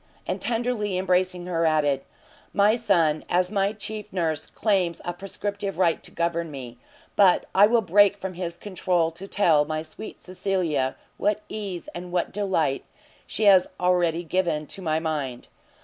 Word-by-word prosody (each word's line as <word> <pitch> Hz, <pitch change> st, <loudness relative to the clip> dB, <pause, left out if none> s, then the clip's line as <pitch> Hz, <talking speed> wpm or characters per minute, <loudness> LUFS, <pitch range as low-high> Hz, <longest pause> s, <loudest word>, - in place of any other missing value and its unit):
and -, -, -3 dB
tenderly 225 Hz, -5 st, -1 dB
embracing 185 Hz, -1 st, +1 dB
her, 170 Hz, -2 st, 0 dB
added, 150 Hz, -4 st, +2 dB, 0.5 s
"My 205 Hz, +2 st, +4 dB
son, 170 Hz, -10 st, +2 dB
as 180 Hz, +1 st, +2 dB
my 200 Hz, -1 st, +1 dB
chief 210 Hz, 0 st, -6 dB
nurse, 160 Hz, -4 st, -1 dB
claims 185 Hz, -6 st, 0 dB
a 175 Hz, -, -2 dB
prescriptive 200 Hz, +2 st, -4 dB
right 170 Hz, -3 st, +2 dB
to -, -, -9 dB
govern 170 Hz, 0 st, -1 dB
me, 125 Hz, -4 st, -8 dB, 0.4 s
but 195 Hz, -3 st, +5 dB
I 205 Hz, +2 st, +7 dB
will 230 Hz, +1 st, +3 dB
break 205 Hz, +2 st, +5 dB
from 190 Hz, -1 st, -5 dB
his 170 Hz, -1 st, -5 dB
control 180 Hz, -4 st, 0 dB
to 180 Hz, +4 st, -10 dB
tell 165 Hz, -8 st, +3 dB
my 155 Hz, +1 st, -3 dB
sweet 160 Hz, +7 st, -9 dB
Cecilia 175 Hz, -8 st, -1 dB, 0.2 s
what 210 Hz, 0 st, 0 dB
ease 200 Hz, -5 st, -5 dB
and 175 Hz, 0 st, -7 dB
what 175 Hz, -1 st, -1 dB
delight 185 Hz, -9 st, 0 dB, 0.4 s
she 220 Hz, -, -3 dB
has 195 Hz, -3 st, +6 dB
already 175 Hz, -2 st, +2 dB
given 170 Hz, -3 st, 0 dB
to 195 Hz, -, -8 dB
my 160 Hz, -3 st, 0 dB
mind! 150 Hz, -6 st, -3 dB
180 Hz, 160 wpm, -25 LUFS, 165-200 Hz, 0.5 s, I